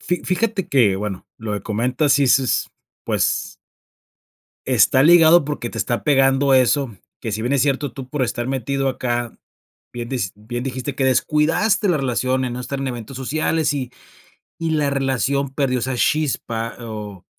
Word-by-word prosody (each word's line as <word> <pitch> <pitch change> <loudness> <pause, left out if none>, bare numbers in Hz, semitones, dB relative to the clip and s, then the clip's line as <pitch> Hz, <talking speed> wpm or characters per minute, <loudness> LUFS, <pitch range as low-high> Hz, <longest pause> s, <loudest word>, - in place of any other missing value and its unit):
Fi 180 - -2
fíjate 200 0 -1
que 110 -8 +3
bueno, 100 -2 -5
lo 110 -2 -5
de 100 - -5
comentas 125 +7 0
sí 140 -1 +3
s 130 -1 +2 0.4
pues - - -1 1.1
está 130 - +4
ligado 165 0 +7
porque 145 -5 -4
te 115 - -7
está 120 +3 -1
pegando 135 -1 +3
eso 130 -3 +2 0.2
que 110 - -4
si 110 - -2
bien 125 +4 -1
es 140 - +3
cierto, 140 -2 0
tú 130 -2 -8
por 135 -2 -1
estar 120 +1 -3
metido 135 +1 -1
acá, 120 -2 -3 0.5
bien 120 -1 -6
dis 120 -9 -2
bien 120 +4 -6
dijiste 130 +1 -4
que 135 - 0
descuidaste 150 - +2
la 170 - +3
relación, 130 -1 0
en 125 - -3
no - - -5
estar 135 +2 -4
en 135 - -2
eventos 120 +1 -7
sociales. 155 +3 0
Y 130 -3 -4 0.7
y 165 -1 -2
la 145 -2 +1
relación 135 0 0
perdió 135 -3 0
esa 130 +2 -2
chispa, 120 -6 -1
o 105 -5 -8
130 Hz, 170 wpm, -20 LUFS, 120-145 Hz, 1.1 s, ligado